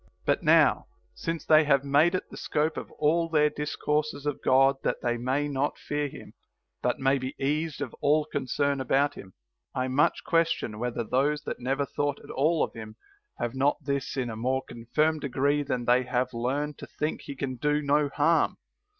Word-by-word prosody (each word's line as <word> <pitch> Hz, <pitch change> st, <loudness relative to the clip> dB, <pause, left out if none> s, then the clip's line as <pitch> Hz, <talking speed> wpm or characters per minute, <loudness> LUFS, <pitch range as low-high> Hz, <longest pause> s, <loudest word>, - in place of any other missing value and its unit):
But -, -, +2 dB
now, -, -, +4 dB, 0.3 s
since 165 Hz, -1 st, -4 dB
they 155 Hz, 0 st, +6 dB
have 140 Hz, -2 st, +3 dB
made 145 Hz, +6 st, +3 dB
it 185 Hz, -, -3 dB
the -, -, -9 dB
scope 155 Hz, +1 st, -1 dB
of -, -, -6 dB
all 165 Hz, +2 st, +1 dB
their 150 Hz, -2 st, +3 dB
discourses 150 Hz, 0 st, -2 dB
of 145 Hz, -2 st, -2 dB
God 135 Hz, +1 st, +4 dB
that -, -, -1 dB
they 120 Hz, 0 st, +1 dB
may 130 Hz, +5 st, -1 dB
not 145 Hz, 0 st, -1 dB
fear 145 Hz, 0 st, -2 dB
him, -, -, -11 dB, 0.5 s
but -, -, 0 dB
may 135 Hz, +1 st, +2 dB
be 130 Hz, +1 st, -5 dB
eased 150 Hz, +3 st, -1 dB
of -, -, -4 dB
all 150 Hz, +1 st, +3 dB
concern 140 Hz, -1 st, -1 dB
about 135 Hz, +3 st, +2 dB
him, 95 Hz, -1 st, -12 dB, 0.4 s
I 130 Hz, 0 st, 0 dB
much 135 Hz, +3 st, +2 dB
question 165 Hz, -10 st, 0 dB
whether 120 Hz, 0 st, -2 dB
those 145 Hz, +6 st, 0 dB
that -, -, -5 dB
never 135 Hz, +3 st, -1 dB
thought 145 Hz, +1 st, -2 dB
at -, -, -10 dB
all 155 Hz, +4 st, +2 dB
of -, -, -3 dB
him 110 Hz, -1 st, -9 dB, 0.4 s
have 120 Hz, 0 st, -2 dB
not 135 Hz, +2 st, +2 dB
this 140 Hz, -1 st, -2 dB
in 125 Hz, -3 st, -1 dB
a -, -, -6 dB
more 130 Hz, +4 st, -1 dB
confirmed 150 Hz, +7 st, 0 dB
degree 140 Hz, +2 st, +1 dB
than 125 Hz, -4 st, -2 dB
they 125 Hz, +1 st, +4 dB
that 125 Hz, -, -9 dB
have 125 Hz, 0 st, 0 dB
learned 140 Hz, +5 st, -2 dB
to -, -, -8 dB
think 150 Hz, +1 st, -3 dB
he 140 Hz, -, -6 dB
can 130 Hz, -1 st, -4 dB
do 150 Hz, +2 st, 0 dB
no 145 Hz, +1 st, +2 dB
harm. 160 Hz, +4 st, +2 dB
140 Hz, 195 wpm, -27 LUFS, 130-150 Hz, 0.5 s, they